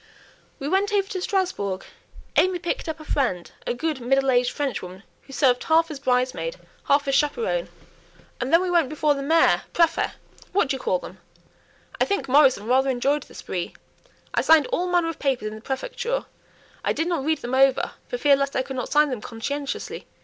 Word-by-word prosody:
We 275 - -5
went 390 +5 +1
over 400 -2 +1
to 380 -3 -4
Strasbourg; 360 - -1 0.5
AimÄe 370 -1 +3
picked 340 - -2
up 320 0 -4
a 310 - -11
friend 215 -14 -1 0.2
a - - 0
good 305 +2 -2
middle 270 +2 +2
aged 245 0 +3
Frenchwoman 195 -9 -4 0.2
who 275 - -16
served 255 -2 +2
half 325 +1 +3
as 290 - -6
bridesmaid, 255 - 0 0.3
half 280 0 +2
as 275 - +1
chaperone, 455 - 0 0.7
and 255 +2 -2
then 335 +2 +5
we 365 - -1
went 335 -6 +3
before 305 0 +2
the 275 - -4
mayor 325 +4 +4
prÄfet 335 -1 +2 0.4
what 380 -8 +2
do 275 - +1
you - - -6
call - - +1
them? - - -11 0.8
I - - +4
think 400 0 -1
Morrison 260 -6 +4
rather 260 +3 +3
enjoyed 275 +4 +1
the - - -15
spree. 175 -2 -5 0.6
I - - +2
signed 315 -3 +5
all 360 - +1
manner 350 -2 +2
of 330 - -6
papers 265 -6 0
in - - -9
the 215 - -9
prefecture; 485 - -3 0.6
I - - +1
did 320 - -1
not 340 -6 -1
read 315 +2 0
them 245 - -5
over, 265 0 +3 0.2
for - - -3
fear 290 -11 +5
lest 275 0 -2
I 260 - +1
could 265 0 -6
not 250 - -4
sign 300 -1 +4
them 245 -4 -4
conscientiously. 275 +6 -5
285 Hz, 200 wpm, -24 LUFS, 260-340 Hz, 0.8 s, then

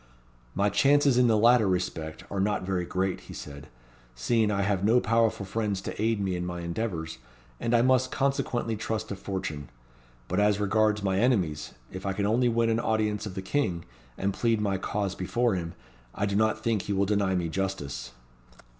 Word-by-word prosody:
"My 100 +1 +2
chances 140 +6 +4
in 125 - +5
the 110 -2 +4
latter 115 0 +5
respect 90 -4 -2
are 100 - -2
not 105 0 0
very 90 -2 -1
great," 95 +1 -1
he - - -8
said, 70 0 -9 0.5
"seeing 110 - +1
I 100 -1 0
have 100 -1 0
no 115 +4 +5
powerful 115 -3 +1
friends 105 0 -2
to 100 - -5
aid 110 -1 +1
me 95 -2 -1
in 90 - -3
my 90 0 -4
endeavours, 85 - -4 0.4
and 115 +1 +1
I 115 - +4
must 130 0 +3
consequently 130 -4 0
trust 110 +1 -3
to 100 - -3
fortune. 95 -7 -5 0.6
But 90 - 0
as 105 0 +3
regards 105 +1 +2
my 95 -1 +1
enemies, 90 - 0 0.2
if 95 +1 -6
I 95 - 0
can 100 +1 -1
only 120 +4 +3
win 115 0 +2
an 115 - +1
audience 105 -2 0
of 95 - -8
the 95 - -4
King, 95 -6 -1 0.3
and 100 +1 -1
plead 115 0 +1
my 100 -3 0
cause 100 -1 -2
before 120 +6 0
him, 85 -2 -4 0.4
I 100 - 0
do 100 -1 -1
not 110 +1 +1
think 115 -4 +1
he 100 - -3
will 100 0 +2
deny 100 -2 +1
me 85 -2 0
justice." 80 -9 -3
100 Hz, 195 wpm, -27 LUFS, 95-115 Hz, 0.6 s, in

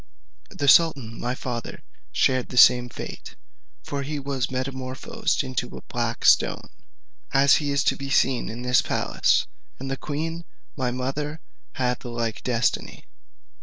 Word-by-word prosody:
The 140 - -3
sultan, 135 -8 +4
my 125 +1 -2
father, 120 -3 -6 0.3
shared 130 -1 +1
the 125 - -7
same 125 0 +7
fate, - - -8 0.5
for 145 -3 -4
he 145 +2 -4
was 135 -2 -2
metamorphosed 130 +3 -2
into 130 -3 -4
a - - -11
black - - -3
stone, - - +4 0.6
as 140 +1 +6
he 145 -2 -2
is 140 0 +1
to - - +2
be 140 0 -6
seen 135 -2 +2
in 115 +3 -6
this 125 0 +4
palace, - - +1 0.3
and 135 +1 -5
the 135 - -2
queen, 160 +4 -4 0.3
my 130 -3 -1
mother, 135 +5 -3 0.3
had 125 -3 -1
the 120 - -8
like 115 -2 -3
destiny. 120 -1 -1
130 Hz, 150 wpm, -24 LUFS, 125-140 Hz, 0.6 s, same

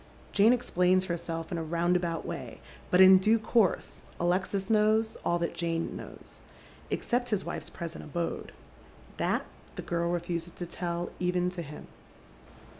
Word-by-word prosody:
Jane 205 +3 +5
explains 185 -6 +2
herself 165 -2 -4
in 170 - -1
a - - -3
roundabout 170 +1 0
way, - - -6 0.3
but 180 - +5
in 190 0 +9
due 215 +4 +4
course 220 -2 +1 0.2
Alexis 190 +2 0
knows 220 +1 +3
all 175 - +2
that 170 -1 -2
Jane 165 -1 -2
knows, - - -11 0.5
except 245 0 -1
his 210 -4 0
wife's - - -5
present 170 -2 -7
abode. 170 +3 -3 0.7
That - - 0 0.3
the - - -5
girl 170 0 -1
refuses 175 0 -3
to 175 - -6
tell 175 0 -3
even 180 0 +1
to 180 -1 -5
him. 150 -2 -9
180 Hz, 145 wpm, -29 LUFS, 170-190 Hz, 0.7 s, in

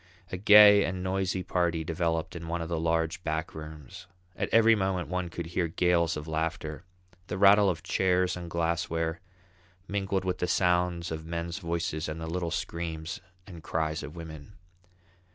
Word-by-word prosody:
A 95 - -3
gay 105 +1 +8
and 90 +1 -3
noisy 95 0 -1
party 85 -3 0
developed 80 0 -2
in 85 -1 -7
one 85 +1 -2
of 85 0 -5
the 85 -2 -1
large 80 +1 0
back 80 0 -2
rooms; 80 +3 -10 0.3
at - - -2
every 115 0 +6
moment 95 -6 -1
one 90 -1 -2
could 85 0 -5
hear 85 +1 -1
gales 85 -1 +1
of 75 +1 -7
laughter, 80 0 -3 0.4
the - - -4
rattle 100 +1 +6
of 80 -5 -3
chairs 90 -1 +1
and 85 -1 -7
glassware, 85 0 -1 0.7
mingled 95 -1 -1
with 90 -1 -1
the 90 - 0
sounds 90 -2 +1
of 80 0 -5
men's 85 +2 -4
voices 85 -3 -2
and 80 +1 -5
the 80 - -5
little 85 +1 -2
screams 85 -2 -4 0.2
and 85 -4 -11
cries 80 0 -2
of 75 +2 -8
women. 80 +1 -9
85 Hz, 170 wpm, -28 LUFS, 80-90 Hz, 0.7 s, gay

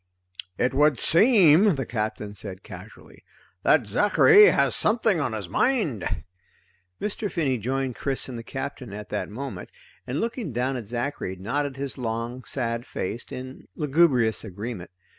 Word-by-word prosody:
"It 125 - +1
would 145 0 +4
seem," 190 - +5
the 135 -2 -3
Captain 105 -2 -3
said 95 -2 -8
casually, - - -13 0.4
"that 130 +3 +4
Zachary 210 - +6
has - - +3
something 215 -4 +2
on 135 -6 -1
his 105 -4 -4
mind." 150 - 0 0.8
Mr. 210 0 -3
Finney 135 -7 0
joined 130 +3 -2
Chris 135 -2 -1
and 130 - -7
the 115 - -5
Captain 135 -3 -6
at 105 0 -8
that - - -3
moment, 130 +6 -7 0.4
and 130 +5 -2
looking 230 - -3
down 125 +3 -1
at 120 -5 -6
Zachary 120 -4 -3
nodded 135 +9 -3
his 135 -1 -4
long 115 +1 -4
sad 115 -3 -2
face 115 0 -4
in 130 +1 -8
lugubrious 140 -7 +2
agreement. 105 -1 -6
130 Hz, 145 wpm, -25 LUFS, 115-150 Hz, 0.8 s, Zachary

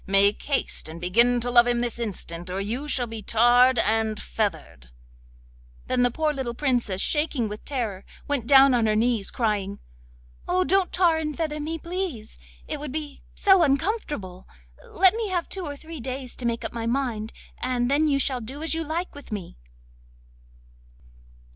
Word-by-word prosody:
Make 200 +1 +4
haste 275 - 0
and 165 +1 -8
begin 235 +8 +3
to 245 +1 -2
love 240 0 +6
him 240 0 +1
this 240 -1 -1
instant, 180 -6 -5
or 185 +2 -3
you 235 +9 -3
shall 255 -4 0
be 225 -1 -7
tarred 240 +4 +4
and 220 0 +2
feathered.' 165 - -4 1.0
Then 255 -1 0
the 245 - +4
poor 305 +5 -1
little 260 -4 -4
Princess, 240 -8 0
shaking 295 -3 0
with 210 0 -8
terror, 225 -9 -3 0.2
went 275 -5 -1
down 275 -1 +7
on 235 -3 +2
her 215 - +2
knees, 225 -2 +1
crying: 205 -4 -1 0.7
'Oh, 365 +1 +2
don't 380 0 +1
tar 345 -3 +3
and 305 -2 -4
feather 310 -2 -2
me, 315 +2 -3
please! 335 - -5 0.3
It - - -4
would 295 -2 -6
be 295 -1 -6
so 385 -2 +5
uncomfortable. 275 - -1 0.4
Let 380 +1 +5
me 450 -1 -2
have 355 -2 -1
two 375 -4 -4
or 285 - -5
three 315 +2 -10
days 255 +1 -5
to 245 - -1
make 230 0 -2
up - - -5
my 230 -1 -3
mind, 235 -4 -2 0.3
and 250 -1 0
then 300 +2 +3
you 280 -2 +2
shall 265 -2 0
do 270 +7 -7
as 325 - 0
you 325 0 -1
like 330 +4 -3
with 285 -4 -12
me. 200 -5 -6
250 Hz, 180 wpm, -25 LUFS, 220-300 Hz, 1.0 s, down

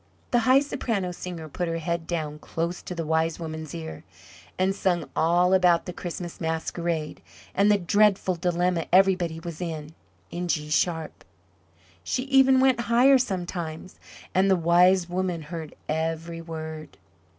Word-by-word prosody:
The 240 - +4
High 265 +2 +7
Soprano 230 -10 -2
Singer 175 -2 -7
put 175 +4 -3
her 165 0 -2
head 165 0 -3
down 155 -3 -3
close 170 +3 -3
to 180 - -7
the 165 -1 -3
Wise 160 +1 0
Woman's 160 -2 -6
ear, 80 -1 -7 0.5
and 190 +1 +2
sung 180 -3 0
all 175 +3 +3
about 180 -2 +4
the 180 - -6
Christmas 175 0 -6
Masquerade 160 0 -2 0.3
and 200 +2 +4
the 205 - +5
dreadful 200 +1 +2
dilemma 175 -1 0
everybody 180 -3 +3
was 170 0 -7
in, 160 -3 -5 0.4
in 175 +1 -3
G 150 -3 -2
sharp 160 +2 -1 0.8
she 255 - -1
even 265 -1 +5
went 260 -2 +4
higher, 260 +3 +6
sometimes, 180 -6 -4 0.3
and 190 +1 +3
the 190 - +5
Wise 175 +1 +4
Woman 180 -2 -2
heard 160 -1 -7
every 165 +1 -2
word. 160 -2 -7
175 Hz, 150 wpm, -26 LUFS, 160-185 Hz, 0.8 s, High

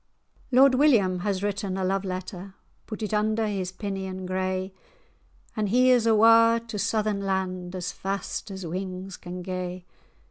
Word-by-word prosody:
Lord 265 +1 +6
William 230 -10 +4
has 195 +1 -2
written 200 -2 -2
a 190 - -2
love 195 +1 0
letter, 185 0 -6 0.3
Put 220 0 -6
it 215 - -3
under 215 +1 +1
his 195 -3 -2
pinion 190 -1 -5
grey; 185 +1 -2 0.8
An' 215 -1 0
he 250 +5 +4
is 240 -2 +4
awa' 230 +1 +6
to 210 -2 -4
Southern 215 -1 0
land 185 -2 -2
As 180 -1 -3
fast 195 +2 -4
as 190 -2 -7
wings 185 +2 -5
can 180 0 -8
gae. 180 -1 -5
195 Hz, 150 wpm, -26 LUFS, 185-215 Hz, 0.8 s, Lord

